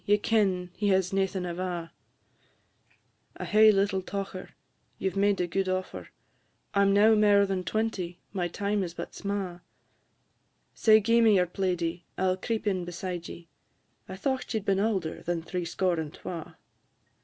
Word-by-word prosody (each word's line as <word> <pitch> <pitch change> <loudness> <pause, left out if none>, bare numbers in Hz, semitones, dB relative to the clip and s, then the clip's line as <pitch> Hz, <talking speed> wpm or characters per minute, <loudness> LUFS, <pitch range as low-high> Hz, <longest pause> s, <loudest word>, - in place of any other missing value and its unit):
ye 205 +1 +3
ken 200 -5 +1
he 210 - -1
has 190 -1 +2
naething 190 -1 0
ava. 175 -1 -4 1.5
I - - -5
hae 215 +1 +6
little 195 -1 +1
tocher; 195 0 -5 0.5
you 190 - -1
've - - -16
made 200 0 +2
a 180 - +1
gude 190 +2 -1
offer; 185 0 -3 0.7
I 200 - +3
'm 200 0 +4
now 210 +3 +6
mair 205 -1 +5
than 190 -2 -2
twenty 185 -3 -2
my 180 -3 -1
time 200 +3 -1
is 175 -2 -4
but - - -7
sma'; 195 -3 -4 1.1
Sae 220 -1 +5
gi'e 230 +3 +3
me 220 -2 +6
your 180 -1 +4
plaidie, 180 -2 -2 0.2
I - - -1
'll 185 - 0
creep 225 +3 -3
in 190 -3 0
beside 175 0 -5
ye 170 -1 -10 0.6
I 190 - -5
thocht 260 +4 -2
ye - - +2
'd 200 - -14
been 195 -1 +2
aulder 195 -6 -1
than 170 -1 -2
threescore 175 0 -1
and 155 -2 -4
twa." 170 -1 -8
190 Hz, 165 wpm, -28 LUFS, 180-205 Hz, 1.5 s, hae